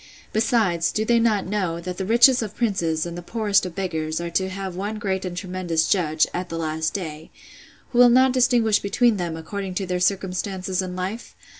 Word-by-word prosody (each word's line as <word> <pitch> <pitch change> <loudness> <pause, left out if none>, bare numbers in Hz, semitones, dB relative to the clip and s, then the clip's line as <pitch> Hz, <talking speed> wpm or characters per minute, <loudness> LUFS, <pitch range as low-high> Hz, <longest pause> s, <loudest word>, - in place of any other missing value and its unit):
Besides, 215 -7 +1
do 215 - -1
they 235 +1 +3
not 220 -4 +1
know, 185 -4 -2
that 180 +1 -6
the 190 - -3
richest 240 +3 +6
of 215 -2 -5
princes, 170 -9 0
and 170 0 -6
the 175 - -6
poorest 205 0 +1
of 175 - -10
beggars, 160 -5 -2
are 170 0 -4
to 190 +1 0
have 190 -1 -5
one 205 +3 -4
great 190 -3 -2
and 175 -1 -5
tremendous 180 -4 -1
judge, 155 -5 +2
at 180 0 -4
the 165 - -4
last 160 +1 -2
day; 160 -4 -6 0.6
who 245 - 0
will 245 0 +8
not 255 +1 +5
distinguish 240 -4 +3
between 225 +2 +2
them, 170 -3 -3
according 190 +3 -5
to 195 - -1
their 180 0 -2
circumstances 185 0 -1
in 180 -1 -5
life? 190 +6 -5
190 Hz, 200 wpm, -23 LUFS, 175-215 Hz, 0.6 s, will